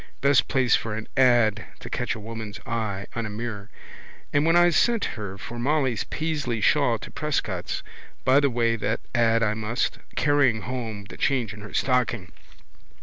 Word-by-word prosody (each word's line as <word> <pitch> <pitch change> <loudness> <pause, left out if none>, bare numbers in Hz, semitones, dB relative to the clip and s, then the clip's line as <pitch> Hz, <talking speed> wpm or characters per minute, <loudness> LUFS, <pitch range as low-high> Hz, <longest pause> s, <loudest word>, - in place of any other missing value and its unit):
Best 140 0 +4
place 130 -3 +3
for 110 -2 -2
an 110 0 -6
ad 120 -5 +4 0.2
to - - -9
catch - - -2
a - - -7
woman's 110 -1 -7
eye 110 -5 -3
on 115 -2 -2
a - - -6
mirror. 105 -1 -5 0.6
And 145 +2 +3
when 165 - +4
I 175 0 +6
sent 230 +6 +2
her 100 -3 -6
for 120 +4 -7
Molly's 135 -3 +1
Paisley 150 -7 -2
shawl - - +3
to - - -10
Prescott's - - -2 0.4
by 130 +2 +6
the 140 -1 +3
way 115 -2 +1
that 110 +1 -1
ad 115 -2 +3
I 105 -1 +2
must, 110 +3 -2 0.2
carrying 145 -7 +3
home 115 -5 -4
the - - -10
change 125 -6 0
in 105 - -11
her 105 - -9
stocking! 120 - 0
115 Hz, 175 wpm, -25 LUFS, 110-135 Hz, 0.6 s, I